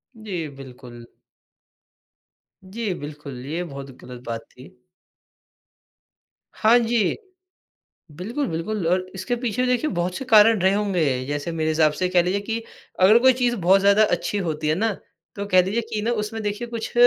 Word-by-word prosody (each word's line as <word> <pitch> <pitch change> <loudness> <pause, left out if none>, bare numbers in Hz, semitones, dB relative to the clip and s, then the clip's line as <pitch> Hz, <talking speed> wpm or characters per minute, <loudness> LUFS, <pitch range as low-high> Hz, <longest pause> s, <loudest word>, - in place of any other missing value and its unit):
जी, 190 -8 -5
बिल्कुल। 125 -3 -11 1.6
जी, 205 +1 -4
बिल्कुल 145 -3 -8
ये 165 +5 -3
बहुत 140 -4 -8
गलत 125 -1 -10
बात 115 -1 -3
थी। 130 +2 -15 1.8
हाँ 225 +3 +4
जी, 230 -4 +1 1.0
बिल्कुल, 230 - -3
बिल्कुल 170 +3 -3
और 185 +1 +1
इसके 190 +6 -2
पीछे 245 +1 -1
देखिए 250 +5 +1
बहुत 175 0 -2
से - - -5
कारण 220 -3 +6
रहे 190 +2 +3
होंगे। 170 -11 0
जैसे 145 +4 -3
मेरे 160 -1 -1
हिसाब 155 -1 +3
से 185 - -3
ये 180 - 0
कह 180 -1 +4
लीजिए 185 +3 -1
कि 225 +3 -3 0.4
अगर 210 +5 +7
कोई 260 +2 +6
चीज़ 245 -1 0
बहुत 190 0 +4
ज़्यादा 200 +2 +5
अच्छी 210 - -1
होती 155 -5 -2
है 155 - +3
ना, 220 +5 0 0.4
तो 200 - -4
कह 185 -2 +5
लीजिए 200 +6 -1
कि 210 -1 -1
ना 230 - 0
उसमें 220 +1 -5
देखिए 210 +3 -3
कुछ 230 -1 -5
190 Hz, 165 wpm, -23 LUFS, 155-220 Hz, 1.8 s, अगर